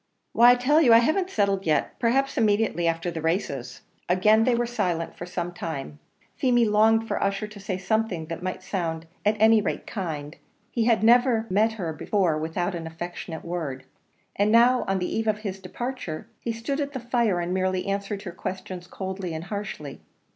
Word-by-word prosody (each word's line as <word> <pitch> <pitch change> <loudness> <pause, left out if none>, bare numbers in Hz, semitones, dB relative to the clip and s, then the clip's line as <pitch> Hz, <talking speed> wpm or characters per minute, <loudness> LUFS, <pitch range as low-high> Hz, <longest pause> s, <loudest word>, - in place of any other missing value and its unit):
"Why, 240 +1 +7
I 245 - +7
tell 285 +6 +3
you, 245 -7 +6
I - - +9
haven't 315 +11 +2
settled 200 - 0
yet 155 - 0
perhaps 270 +4 +1
immediately 210 -5 +2
after 165 +1 -1
the 160 - -5
races." 140 -7 -2 0.3
Again 215 +5 +4
they 250 - +3
were 240 +1 +1
silent 185 -9 -2
for 175 - -7
some 175 -1 -4
time; 140 - -6 0.4
Feemy 240 -2 +3
longed 220 +1 +3
for - - -2
Ussher 200 +2 0
to 210 -1 -12
say 190 -2 -3
something 200 -4 -1
that 165 +1 -6
might 185 0 -4
sound 165 -4 -3 0.2
at 210 +1 +2
any 220 0 +6
rate - - -3
kind; 155 -7 -5 0.3
he 230 -2 0
had 230 -2 +3
never 235 0 +4
met 215 +4 +3
her 175 -7 -4
before 175 +1 +1
without 165 +4 -2
an 165 -2 -5
affectionate 165 0 -7
word 155 -7 -4 0.5
and 205 +1 +2
now, 245 +2 +5
on 195 0 +1
the 180 -1 -2
eve 225 0 -1
of 215 -1 +2
his 195 -3 -4
departure, 190 -3 -5
he 235 - -3
stood 230 +6 -3
at 285 0 -3
the 260 - -3
fire 235 -6 +1
and 175 +1 -2
merely 185 0 0
answered 200 0 -3
her 185 - -6
questions 185 0 -6
coldly 190 -3 -5
and 160 - -5
harshly. 195 -9 -6
195 Hz, 190 wpm, -25 LUFS, 175-225 Hz, 0.5 s, I